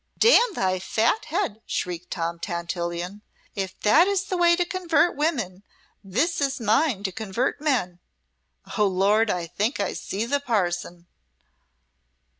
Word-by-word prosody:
"'Damn 470 -1 +5
thy 185 -1 0
fat 225 - +1
head,'" 310 - -2
shrieked 180 0 -3
Tom 170 -1 -3
Tantillion, 170 +2 -4 0.3
"'If 190 -2 -5
that 310 - +5
is 400 -1 +1
thy 390 -1 -3
way 345 -1 +5
to 355 0 0
convert 345 -3 +1
women, 240 - -1 0.4
this 275 - 0
is 275 -1 0
mine 225 0 +1
to 190 - -1
convert 220 +8 -2
men.' 240 - 0 0.8
Oh, 210 - +5
Lord! 200 +4 +2
I 180 -3 -1
think 210 - -2
I 200 - -1
see 205 +4 -3
the 285 +4 0
parson!" 175 -8 -2
215 Hz, 140 wpm, -24 LUFS, 185-310 Hz, 0.8 s, Damn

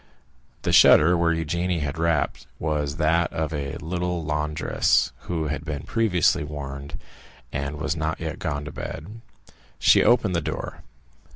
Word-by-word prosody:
The - - 0
shutter 85 +4 +7
where 85 -1 +2
Eugénie 85 +1 -1
had 75 +2 -3
rapped 80 -2 0
was 75 -2 -2
that 80 +2 +2
of 80 0 -2
a 70 -2 -3
little 90 0 -3
laundress, 75 0 +1 0.2
who 80 -3 -1
had 75 +1 -3
been 75 -3 -5
previously 90 -7 +2
warned, 70 -1 -6 0.6
and 70 +1 -3
was 80 +2 -2
not 80 0 -2
yet 80 -1 -5
gone 75 -5 -3
to 80 - -6
bed. 100 +9 -7 0.6
She - - +5
opened 110 -7 +3
the 85 - +1
door. - - -5
80 Hz, 150 wpm, -24 LUFS, 75-85 Hz, 0.6 s, shutter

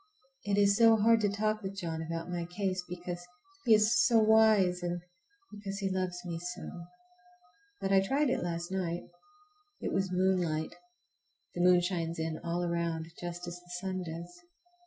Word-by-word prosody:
It 205 -1 +1
is 200 0 +4
so 230 -1 +7
hard 225 +2 +5
to 205 - +2
talk 215 +1 -1
with 195 0 -5
John 165 -3 -3
about 165 +1 -4
my 175 -1 -3
case, 185 +1 -2
because 175 0 -5 0.4
he 225 -3 +7
is 215 +3 +4
so 235 -3 +4
wise, 215 -5 +5
and 175 0 -2 0.5
because 200 -1 -6
he 195 -2 -1
loves 185 -1 -2
me 170 -1 -4
so. 175 0 -7 0.9
But 195 - -2
I 195 -1 +6
tried 270 +7 +1
it - - 0
last 170 0 -3
night. 175 -2 -2 0.8
It - - -3
was 190 -1 0
moonlight. 180 -4 +1 0.8
The 175 - -2
moon 180 0 +6
shines 170 -2 -2
in 160 -1 -3
all 170 +1 -1
around, 170 -1 -2
just 175 0 -5
as 175 0 -7
the 175 0 -17
sun 185 0 -3
does. 170 +1 -7
180 Hz, 170 wpm, -31 LUFS, 175-200 Hz, 0.9 s, so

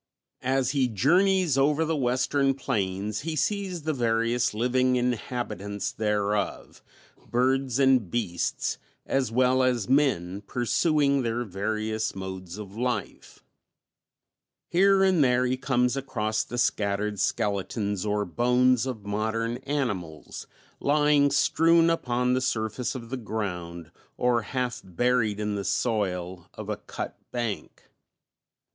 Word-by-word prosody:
As 130 0 +1
he 135 -3 +2
journeys 170 - +3
over 150 +3 +3
the 160 0 0
western 135 +1 +1
plains 105 -5 -2
he 160 +1 -4
sees 185 +1 -1
the 155 +1 0
various 120 0 +1
living 125 +3 +1
inhabitants 120 -5 -2
thereof, 105 -1 -2 0.5
birds 130 +1 +1
and 130 -7 +3
beasts, 95 -7 -2 0.3
as 135 -4 0
well 130 +2 +3
as 125 -5 +1
men, 115 -9 +1
pursuing 140 +3 +2
their 120 0 -1
various 110 +2 -2
modes 95 -1 -6
of 100 -2 -9
life; 120 -3 -4 1.3
here 195 +2 +4
and 185 -5 +4
there 125 -1 +3
he 125 +1 +1
comes 125 -1 +1
across 110 -5 -1
the 120 - -7
scattered 105 -2 0
skeletons 100 0 -1
or 105 -1 0
bones 125 +6 +2
of 110 -6 -5
modern 110 +3 -1
animals 115 - -4 0.3
lying 145 0 +3
strewn 165 +4 +4
upon 125 -5 0
the 130 - +1
surface 115 +1 -2
of 120 -2 -8
the 130 - -2
ground 90 -7 -5 0.3
or 125 -1 +2
half 125 +2 -3
buried 110 +2 0
in 105 0 -1
the 100 -1 -2
soil 95 -4 -2
of - - -7
a - - -2
cut - - -7
bank. 120 -4 -4
120 Hz, 125 wpm, -26 LUFS, 105-135 Hz, 1.3 s, here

